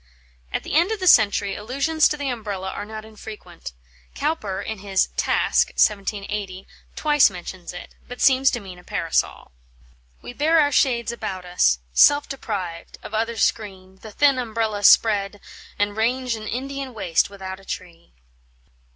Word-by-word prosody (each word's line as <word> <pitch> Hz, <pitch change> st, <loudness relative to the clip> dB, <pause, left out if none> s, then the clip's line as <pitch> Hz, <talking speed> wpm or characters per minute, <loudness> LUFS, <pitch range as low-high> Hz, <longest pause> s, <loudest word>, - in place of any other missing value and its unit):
At -, -, -2 dB
the -, -, -6 dB
end 340 Hz, +7 st, +3 dB
of 440 Hz, -, -2 dB
the 370 Hz, -, -3 dB
century 205 Hz, -, +4 dB
allusions 280 Hz, +8 st, +1 dB
to 300 Hz, -, -3 dB
the 285 Hz, -1 st, -4 dB
Umbrella 200 Hz, -5 st, -5 dB
are 205 Hz, -, -6 dB
not 215 Hz, 0 st, -8 dB
infrequent. 210 Hz, -, -10 dB, 0.4 s
Cowper, 245 Hz, -11 st, -2 dB
in 220 Hz, +1 st, -5 dB
his 195 Hz, -1 st, 0 dB
"Task" -, -, +2 dB
(1780), 200 Hz, -2 st, -1 dB, 0.3 s
twice 295 Hz, -4 st, +4 dB
mentions 180 Hz, -1 st, -8 dB
it, 180 Hz, -, -10 dB
but 245 Hz, -, -9 dB
seems 265 Hz, 0 st, +5 dB
to 240 Hz, -, -2 dB
mean 185 Hz, -4 st, -11 dB
a -, -, -17 dB
Parasol: 165 Hz, -2 st, -2 dB, 0.7 s
"We -, -, -8 dB
bear 315 Hz, +5 st, +3 dB
our 290 Hz, -1 st, +3 dB
shades 240 Hz, -4 st, +2 dB
about 200 Hz, -6 st, -5 dB
us; 175 Hz, -, +2 dB, 0.2 s
self 290 Hz, -, +5 dB
deprived 190 Hz, -10 st, -6 dB
Of -, -, -9 dB
other 225 Hz, +1 st, -1 dB
screen, 190 Hz, -3 st, -2 dB
the 220 Hz, -, -11 dB
thin 275 Hz, +4 st, +3 dB
umbrella 220 Hz, -3 st, -2 dB
spread, 205 Hz, -1 st, +4 dB, 0.4 s
And 205 Hz, 0 st, 0 dB
range 245 Hz, +3 st, 0 dB
an 215 Hz, -1 st, -8 dB
Indian 270 Hz, +1 st, -5 dB
waste 185 Hz, -5 st, +1 dB
without 190 Hz, -1 st, -8 dB
a -, -, -17 dB
tree." 170 Hz, -, -8 dB
215 Hz, 160 wpm, -22 LUFS, 190-255 Hz, 0.7 s, seems